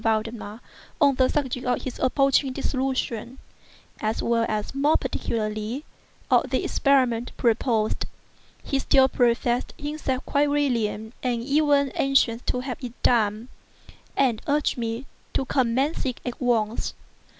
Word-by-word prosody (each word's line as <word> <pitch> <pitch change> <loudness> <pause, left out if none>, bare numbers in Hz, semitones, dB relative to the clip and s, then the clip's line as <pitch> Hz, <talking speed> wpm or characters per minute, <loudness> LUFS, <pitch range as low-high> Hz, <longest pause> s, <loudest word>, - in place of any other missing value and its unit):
Valdemar 225 0 -2 0.4
on 285 -3 +5
the 255 0 +3
subject 260 -4 -1
of 250 - 0
his 260 - -5
approaching 275 +1 +3
dissolution, 260 -3 -2 0.6
as 215 +1 -1
well 230 -1 +2
as, 215 +2 -2
more 285 +3 +3
particularly, 215 +5 -3 0.5
of - - +4
the - - 0
experiment 250 -4 +2
proposed. 230 -2 +1 0.6
He 275 - 0
still 265 0 +5
professed 240 -1 +1
himself 290 -4 -3
quite 290 0 +2
willing 235 -6 0
and 240 -2 -1
even 285 0 +3
anxious 265 -4 +2
to 250 - 0
have 255 0 -6
it 240 -2 -5
made, 220 -1 +2 0.7
and 250 -6 +2
urged 295 +1 +1
me 230 +1 -3 0.3
to 265 - +1
commence 265 +4 +1
it 255 - -3
at 245 +1 -5
once. 230 -3 0
250 Hz, 130 wpm, -25 LUFS, 230-275 Hz, 0.7 s, on